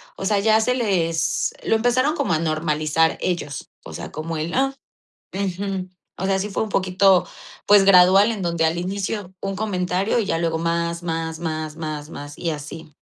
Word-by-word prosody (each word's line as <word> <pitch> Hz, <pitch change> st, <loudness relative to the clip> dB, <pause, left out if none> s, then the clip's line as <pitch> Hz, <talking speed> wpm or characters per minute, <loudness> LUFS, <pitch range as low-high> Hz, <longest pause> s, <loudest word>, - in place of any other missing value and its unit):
o -, -, -5 dB
sea, 205 Hz, 0 st, +2 dB
ya 220 Hz, +2 st, +4 dB
se 250 Hz, +3 st, +1 dB
les 165 Hz, -8 st, 0 dB
lo -, -, +2 dB
empezaron 250 Hz, +6 st, +2 dB
como 280 Hz, -, 0 dB
a 155 Hz, -, +1 dB
normalizar 155 Hz, 0 st, +1 dB
ellos, 150 Hz, -6 st, -3 dB
o -, -, -10 dB
sea, -, -, -7 dB
como 160 Hz, +1 st, -4 dB
el: 160 Hz, +3 st, -3 dB
"Ah. 270 Hz, +1 st, +1 dB, 0.6 s
Ujú". 190 Hz, -1 st, -3 dB, 0.3 s
O -, -, 0 dB
sea, 195 Hz, 0 st, +1 dB
sí 205 Hz, +2 st, -3 dB
fue 200 Hz, -, -1 dB
un 220 Hz, -, -3 dB
poquito, 190 Hz, -1 st, +3 dB, 0.4 s
pues, 205 Hz, -1 st, +7 dB
gradual, 195 Hz, +3 st, +7 dB
en 210 Hz, -4 st, -3 dB
donde 170 Hz, -2 st, +1 dB
al 160 Hz, +1 st, 0 dB
inicio 195 Hz, +2 st, -3 dB
un 195 Hz, 0 st, -3 dB
comentario. 195 Hz, +1 st, 0 dB
Y 220 Hz, -, 0 dB
ya 165 Hz, -, 0 dB
luego 165 Hz, -1 st, 0 dB
más, 170 Hz, +1 st, -1 dB
más, 165 Hz, -1 st, -3 dB
más, 155 Hz, -2 st, -4 dB
más, 155 Hz, -2 st, -5 dB
más, 145 Hz, -2 st, -8 dB
y 170 Hz, -, -2 dB
así. 150 Hz, 0 st, -7 dB
180 Hz, 190 wpm, -22 LUFS, 160-200 Hz, 0.6 s, pues